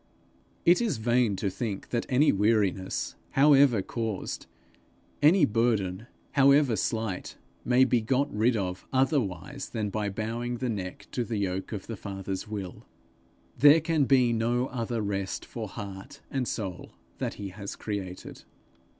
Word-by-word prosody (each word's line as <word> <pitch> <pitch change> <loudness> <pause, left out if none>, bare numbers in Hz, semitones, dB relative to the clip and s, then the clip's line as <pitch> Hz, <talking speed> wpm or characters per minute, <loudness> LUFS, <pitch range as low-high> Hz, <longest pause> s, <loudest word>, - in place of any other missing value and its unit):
It 175 +6 +5
is 220 - 0
vain 120 -1 +2
to 95 0 -2
think 105 -2 -4
that 120 - -2
any 140 +3 +4
weariness, 100 -2 +1 0.2
however 135 -6 +5
caused, 110 -4 -4 0.7
any 155 +2 +6
burden, 110 -3 0 0.2
however 140 -2 +5
slight, 110 -4 -2 0.3
may 125 +2 +4
be 120 -2 +2
got 130 +4 0
rid 115 +2 +3
of 90 -2 -4
otherwise 130 - 0
than 105 -3 -3
by 105 -1 -1
bowing 115 +4 -3
the 125 0 -2
neck 95 -5 -5
to 125 - -1
the 115 -2 -3
yoke 95 -1 -2
of 105 -4 -5
the 115 - -5
Father's 95 0 -5
will. 100 -4 -6 0.7
There 145 +5 +7
can 160 -2 +1
be 125 -3 +4
no 120 +2 +1
other 115 -2 -2
rest 100 -1 -3
for 115 -3 -6
heart 100 -1 -8
and 130 -3 -1
soul 95 -5 -5 0.3
that - - -2
he 100 -1 -6
has 100 +1 -7
created. 95 -4 -6
115 Hz, 145 wpm, -28 LUFS, 100-125 Hz, 0.7 s, There